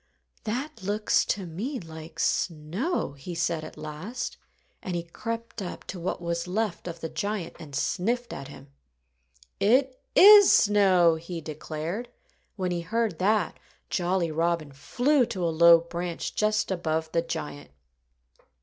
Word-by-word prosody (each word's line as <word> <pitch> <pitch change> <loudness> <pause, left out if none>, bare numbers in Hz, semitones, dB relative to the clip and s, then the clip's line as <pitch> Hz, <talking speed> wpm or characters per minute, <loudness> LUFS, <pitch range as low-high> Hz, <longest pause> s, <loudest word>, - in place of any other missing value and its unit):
"That 250 +6 -4
looks 205 +3 +1
to 195 -2 -2
me 220 - -4
like 160 -1 -10
snow," 170 - -1
he 140 +5 -8
said 165 -1 -1
at 155 - -10
last. 155 +11 -5 0.5
And 185 - -4
he 170 - -2
crept 230 +6 -6
up 180 - -6
to 185 - -7
what 170 - -3
was 170 0 -3
left 200 -1 -2
of 170 -1 -7
the 160 - -2
giant 200 0 -3
and 145 -4 -9
sniffed 235 - -1
at 135 0 -7
him. 140 0 -13 0.9
"It 255 +4 +2
is 410 0 +10
snow!" 185 -5 +5
he 170 +1 -6
declared. 160 +8 -5 0.5
When 185 -2 -2
he 175 -1 -1
heard 220 +1 -1
that, 200 -1 +1 0.3
Jolly 175 -2 0
Robin 165 -1 0
flew 245 - +2
to 195 -6 -4
a 165 - 0
low 170 +1 +8
branch 170 0 -4
just 215 -1 +1
above 160 -3 -1
the 165 - +2
giant. 145 - -6
175 Hz, 145 wpm, -27 LUFS, 160-215 Hz, 0.9 s, is